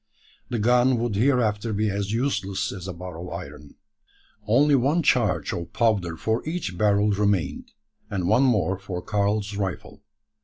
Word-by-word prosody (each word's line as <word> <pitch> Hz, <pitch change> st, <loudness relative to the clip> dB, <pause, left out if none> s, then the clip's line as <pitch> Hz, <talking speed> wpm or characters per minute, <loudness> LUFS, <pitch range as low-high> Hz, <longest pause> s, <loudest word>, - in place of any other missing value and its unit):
The 120 Hz, -, -2 dB
gun 125 Hz, +3 st, +3 dB
would 115 Hz, -1 st, -1 dB
hereafter 115 Hz, -2 st, +1 dB
be 105 Hz, +2 st, 0 dB
as 100 Hz, 0 st, -2 dB
useless 105 Hz, -5 st, -1 dB
as 95 Hz, -2 st, -7 dB
a 95 Hz, -, -4 dB
bar 90 Hz, -1 st, -8 dB
of 90 Hz, +1 st, -7 dB
iron. 75 Hz, 0 st, -9 dB, 0.7 s
Only 140 Hz, +7 st, +4 dB
one 140 Hz, +6 st, +2 dB
charge -, -, +1 dB
of 85 Hz, -1 st, -6 dB
powder 100 Hz, -8 st, +1 dB
for 110 Hz, +6 st, -1 dB
each 160 Hz, -, -4 dB
barrel 105 Hz, +2 st, +2 dB
remained, 100 Hz, -8 st, -1 dB, 0.4 s
and 90 Hz, -3 st, -2 dB
one 110 Hz, +6 st, +4 dB
more 100 Hz, -8 st, +2 dB
for 90 Hz, -3 st, -6 dB
Karl's 105 Hz, 0 st, -1 dB
rifle. 95 Hz, -3 st, -4 dB
105 Hz, 155 wpm, -24 LUFS, 95-120 Hz, 0.7 s, Only